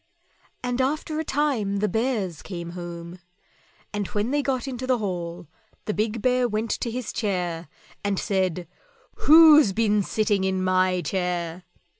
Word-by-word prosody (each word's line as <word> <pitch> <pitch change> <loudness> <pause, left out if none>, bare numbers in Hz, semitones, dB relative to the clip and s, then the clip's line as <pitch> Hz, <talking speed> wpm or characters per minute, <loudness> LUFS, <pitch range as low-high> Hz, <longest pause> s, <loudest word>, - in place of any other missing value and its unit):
And 245 +1 -1
after 305 +3 -1
a - - -1
time 260 -10 0
the 210 +1 +1
Bears 210 - -1
came 170 -3 -7
home, 175 0 -8 0.7
and 205 -2 -2
when 210 +4 -2
they 290 0 +2
got 270 -1 -2
into 255 -1 -5
the 255 -1 +3
hall 175 -5 -4 0.4
the 210 - -1
big 215 +1 -2
Bear 250 -1 +3
went 220 0 -2
to 235 - -2
his 245 0 -4
chair 180 -6 -2 0.4
and 200 -1 0
said, 185 -4 -1 0.5
"WHO'S 305 -7 +7
BEEN 210 -1 +2
SITTING 205 -1 0
IN 190 -1 0
MY 185 -1 +2
CHAIR?" 180 -2 -2
205 Hz, 150 wpm, -25 LUFS, 180-245 Hz, 0.7 s, WHO'S